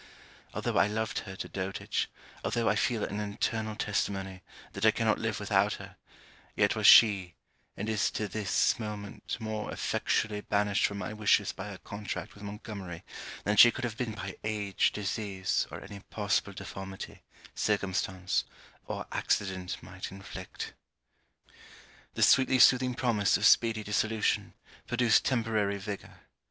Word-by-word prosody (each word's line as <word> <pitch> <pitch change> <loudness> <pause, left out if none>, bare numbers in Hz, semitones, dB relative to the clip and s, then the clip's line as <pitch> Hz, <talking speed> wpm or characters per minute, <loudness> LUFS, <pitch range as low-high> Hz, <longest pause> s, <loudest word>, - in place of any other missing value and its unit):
Although - - -1
I - - +5
loved 110 +1 -2
her 95 - -7
to - - -5
dotage, 95 0 -3 0.3
although 115 -1 0
I - - +3
feel 120 -5 +1
an 100 - -3
internal 110 +1 -2
testimony 95 -3 -2 0.3
that - - -6
I - - +7
cannot - - +1
live - - -2
without - - +2
her, - - -9 0.6
yet - - +3
was - - +3
she, 100 -6 +7 0.4
and 105 - -3
is 110 -2 +1
to 105 - -1
this 100 +4 +1
moment, 105 -2 -5
more 110 -1 -4
effectually 105 -1 -1
banished 105 -1 +1
from 100 - -6
my 100 +1 -4
wishes 105 -2 +3
by 95 - -7
her 100 - -7
contract 100 +2 -6
with 100 - -15
Montgomery, 100 -4 -7 0.4
than 105 +1 0
she 120 - +10
could 130 - -5
have 120 -3 -2
been 115 -2 -3
by 100 -2 -7
age, 105 -2 +1
disease, 100 -2 -1
or - - -7
any 100 0 -9
possible 100 0 -1
deformity, 95 0 -8 0.3
circumstance 95 -2 0 0.4
or - - -4
accident 95 -2 -1
might 95 +1 -7
inflict. 95 -1 -8 1.4
The - - +2
sweetly 130 0 +5
soothing 125 0 +5
promise 115 -6 +2
of 105 - 0
speedy 115 -2 +5
dissolution, 110 +1 0 0.3
produced 120 -1 +3
temporary 110 -5 +1
vigour. 100 0 -7
105 Hz, 145 wpm, -30 LUFS, 95-110 Hz, 1.4 s, she